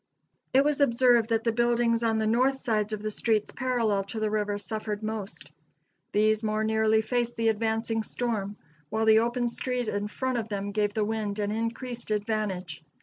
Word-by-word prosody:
It 270 +1 +5
was 295 0 +1
observed 240 -3 +4
that 225 -1 +1
the 230 - +2
buildings 235 0 +2
on 225 -1 +2
the 220 - 0
north 255 +5 +2
sides 220 -5 -1
of 215 -1 -4
the 215 - -2
streets 215 0 0
parallel 235 -6 0
to 220 +3 -5
the 215 -1 0
river 210 -1 0
suffered 215 +1 -4
most. 215 -2 -5 0.6
These 215 +1 +3
more 215 -1 0
nearly 220 0 +2
faced 240 +1 -1
the 225 0 +2
advancing 225 +1 0
storm, 215 -3 -3 0.3
while 220 0 0
the 220 0 +6
open 240 +1 0
street 250 0 -2
in 205 0 -2
front 255 +3 -2
of 225 -1 -5
them 200 -1 -3
gave 205 0 0
the 215 -1 +1
wind 215 -2 -2
an 205 -1 -1
increased 230 +2 -4
advantage. 205 -7 -2
220 Hz, 185 wpm, -27 LUFS, 210-235 Hz, 0.6 s, the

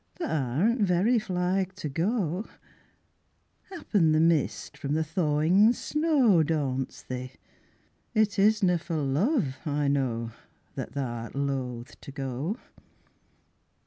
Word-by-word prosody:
Tha 350 - -4 0.3
arena 225 - +2
very 200 +6 +3
flig 185 -1 -1
to 185 -6 -5
go, 180 - -1 1.2
'Appen 205 - +1
the 155 - +3
mist 165 -3 +1
from 140 +1 -2
the 160 - +1
thawin' 160 +7 +3
snow 285 - +3
Daunts 140 -5 -2
thee 130 0 -6 0.8
it 215 -2 +2
isna 195 -4 +4
for 170 -1 -4
love, 150 - 0
I 145 -2 0
know, 120 -5 0 0.4
That - - -6
tha'rt 120 -4 -4
loath 130 -4 -3
to - - -9
go. 135 - -3
160 Hz, 115 wpm, -27 LUFS, 140-200 Hz, 1.2 s, isna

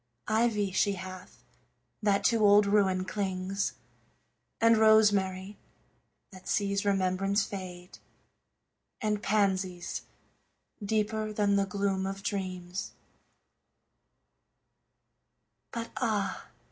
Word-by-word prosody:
Ivy 215 -2 +1
she 200 +2 +2
hath, 185 -1 -9 0.6
that 200 -2 +2
to 230 -3 +3
old 205 0 +6
ruin 195 -2 +2
clings; 195 0 -2 0.9
And 230 0 +5
rosemary, 205 -3 +3 0.7
that 185 -1 -13
sees 200 -1 0
remembrance 195 +1 +1
fade; 180 -2 -8 1.0
And 210 -1 -1
pansies, 190 -4 0 0.8
deeper 215 +1 -1
than 205 -1 +1
the 200 -1 +1
gloom 195 -1 -1
of 195 0 -6
dreams; 185 -2 -4 2.8
But 230 -1 -5
ah! 215 -5 -1
200 Hz, 85 wpm, -29 LUFS, 190-210 Hz, 2.8 s, old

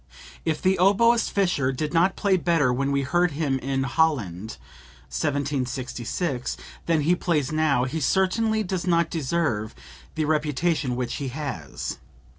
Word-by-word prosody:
"If 160 -2 -1
the 190 0 +3
oboist 230 +5 +4
Fischer 175 -10 +1
did 150 +3 -3
not 175 +3 +3
play 200 -2 +2
better 165 -7 +2
when 135 +2 0
we 140 0 +1
heard 175 +4 +1
him 140 -3 0
in 135 +1 -1
Holland 120 - 0 0.6
(1766) 130 - -2 0.3
than 165 -2 +3
he 160 +5 +3
plays 155 -6 0
now, 155 -5 +2
he 135 +5 -2
certainly 215 +7 +1
does 185 -2 -3
not 170 -2 +2
deserve 140 - -1 0.4
the 155 - 0
reputation 150 -2 0
which 125 -1 -3
he 140 - -3
has. 125 - -5
150 Hz, 140 wpm, -25 LUFS, 130-175 Hz, 0.6 s, oboist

